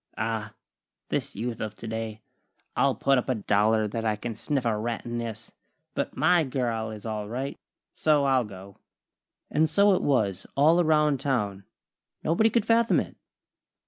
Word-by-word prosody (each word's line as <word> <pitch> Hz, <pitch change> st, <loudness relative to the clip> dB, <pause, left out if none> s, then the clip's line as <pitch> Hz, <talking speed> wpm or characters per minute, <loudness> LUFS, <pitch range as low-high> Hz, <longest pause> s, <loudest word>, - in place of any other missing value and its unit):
Ah! 110 Hz, -1 st, -3 dB, 0.5 s
This -, -, -2 dB
Youth 115 Hz, +2 st, -3 dB
of 110 Hz, -1 st, -4 dB
today! 110 Hz, -1 st, -5 dB, 0.5 s
I'll -, -, +3 dB
put 135 Hz, -1 st, +3 dB
up 125 Hz, -, -5 dB
a 130 Hz, -, +2 dB
dollar 105 Hz, +1 st, +2 dB
that 110 Hz, +2 st, -4 dB
I 110 Hz, -1 st, +1 dB
can 115 Hz, +2 st, -5 dB
sniff 135 Hz, +3 st, -2 dB
a 115 Hz, -2 st, +2 dB
rat 115 Hz, +2 st, -3 dB
in 120 Hz, 0 st, -3 dB
this. 115 Hz, -1 st, -6 dB, 0.4 s
But -, -, -3 dB
my 180 Hz, -2 st, +4 dB
girl 120 Hz, -5 st, -2 dB
is 110 Hz, 0 st, -9 dB
all 105 Hz, -2 st, -4 dB
right, 130 Hz, +4 st, -4 dB, 0.3 s
so 150 Hz, -2 st, +2 dB
I'll 130 Hz, -2 st, +3 dB
go." 100 Hz, -1 st, -11 dB, 0.7 s
And 155 Hz, +1 st, +3 dB
so 200 Hz, +6 st, +5 dB
it 185 Hz, -, +1 dB
was, 100 Hz, -9 st, 0 dB
all 160 Hz, +5 st, +5 dB
around 150 Hz, -4 st, +3 dB
town. 105 Hz, -8 st, -1 dB, 0.6 s
Nobody 195 Hz, +8 st, +3 dB
could 225 Hz, -1 st, +1 dB
fathom 230 Hz, +1 st, +4 dB
it. -, -, -5 dB
115 Hz, 165 wpm, -27 LUFS, 110-145 Hz, 0.7 s, so